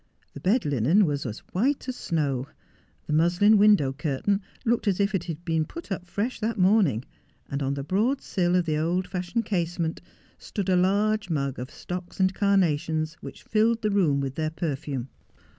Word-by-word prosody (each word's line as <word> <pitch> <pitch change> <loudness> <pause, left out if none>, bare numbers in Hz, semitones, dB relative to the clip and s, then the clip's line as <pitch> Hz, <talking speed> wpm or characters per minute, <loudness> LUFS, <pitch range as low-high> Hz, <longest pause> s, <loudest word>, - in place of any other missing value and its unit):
The - - -8
bed 215 +8 +2
linen 145 - +3
was 145 -4 -2
as 110 -1 -7
white 265 +9 0
as 255 - -3
snow. 140 - -1 0.6
The 150 - -3
muslin 175 +7 +4
window 200 -11 +5
curtain 150 +8 -1 0.2
looked 235 -1 +1
as 195 -1 +2
if 200 0 +1
it 180 -3 -1
had 170 0 -6
been 160 -2 +1
put 330 - -9
up 180 -1 -4
fresh 210 +7 -2
that 225 +1 -1
morning, 185 - +3 0.5
and 140 +1 -2
on 135 0 0
the 140 - -4
broad 220 - +1
sill 180 -2 0
of 180 -1 +2
the 155 -2 0
old 175 +3 0
fashioned 185 +5 -2
casement 170 -4 -2 0.4
stood 200 -3 -4
a 185 - +4
large 200 +3 +2
mug 140 -5 -1
of 125 +2 -5
stocks 180 +2 -7
and 190 0 +3
carnations 160 -6 +1
which - - -10
filled 225 +1 +1
the 210 - +1
room 160 -9 +2
with 135 -1 -3
their 155 +2 -1
perfume. 145 -5 -4
180 Hz, 185 wpm, -26 LUFS, 150-205 Hz, 0.6 s, window